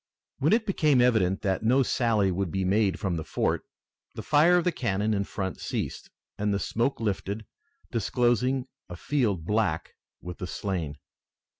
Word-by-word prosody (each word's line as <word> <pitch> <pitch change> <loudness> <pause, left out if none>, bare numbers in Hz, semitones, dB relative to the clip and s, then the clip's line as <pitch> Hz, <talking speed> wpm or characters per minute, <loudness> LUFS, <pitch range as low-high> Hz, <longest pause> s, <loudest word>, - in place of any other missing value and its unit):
When 145 +3 +2
it 225 0 +3
became 155 - +3
evident 110 -7 +3
that 95 -2 0
no 125 +5 +4
sally 110 -6 +2
would 95 0 -1
be 95 +3 -1
made 100 +1 +2
from 95 -5 -1
the 80 - -3
fort, - - -1 0.5
the - - -6
fire 160 +4 +5
of 175 - +2
the 180 - +2
cannon 110 - 0
in 100 -1 0
front 95 -4 -4
ceased, - - -4 0.3
and 105 0 +1
the 100 - +1
smoke 115 +6 -1
lifted, 105 0 -2 0.5
disclosing 125 +2 +1 0.2
a 90 - -6
field 105 - 0
black 105 -5 0 0.3
with 90 -1 -8
the 90 - -4
slain. 85 -7 -3
105 Hz, 165 wpm, -27 LUFS, 95-125 Hz, 0.5 s, fire